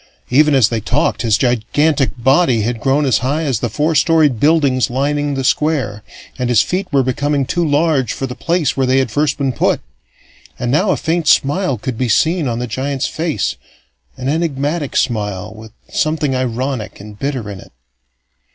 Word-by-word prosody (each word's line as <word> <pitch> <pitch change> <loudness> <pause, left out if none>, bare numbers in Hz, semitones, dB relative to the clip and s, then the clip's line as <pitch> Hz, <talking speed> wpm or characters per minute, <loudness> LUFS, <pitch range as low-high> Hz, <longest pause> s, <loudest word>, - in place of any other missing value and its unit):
Even 150 +2 +4
as 125 -5 +4
they 115 -2 -2
talked, 140 +9 0
his 115 -3 +2
gigantic 135 +4 +1
body 130 -1 +3
had 115 +2 -2
grown 135 +5 +1
as 130 - +2
high 145 +5 -1
as 135 -7 -1
the 120 - -2
four 155 +6 0
storied 150 -4 +3
buildings 145 -4 +2
lining 145 +3 -1
the 135 - -2
Square, 130 -8 0 0.4
and 125 -1 -1
his 120 -4 +5
feet 185 0 -3
were 140 -2 +3
becoming 140 +2 0
too 175 +6 -1
large 150 -4 +1
for 135 - -3
the 125 - -5
place 165 +1 -1
where 135 -1 0
they 130 +1 +3
had 130 -4 +1
first 145 +2 0
been 135 -3 -1
put. - - +1 0.8
And 120 0 -2
now 185 +9 +2
a - - +2
faint 165 -1 -1
smile 140 -1 +2
could 115 +1 -5
be 125 -2 0
seen 160 - +2
on 115 -1 -2
the 125 - -2
giant's 130 +3 -2
face, 160 - -2 0.6
an 130 - -5
enigmatic 150 -1 -1
smile, 105 -3 -2
with 110 0 -12 0.2
something 155 -3 0
ironic 130 -2 -3
and 105 +1 -11
bitter 135 -6 -3
in 100 -2 -7
it. - - -15
135 Hz, 185 wpm, -17 LUFS, 120-150 Hz, 0.8 s, his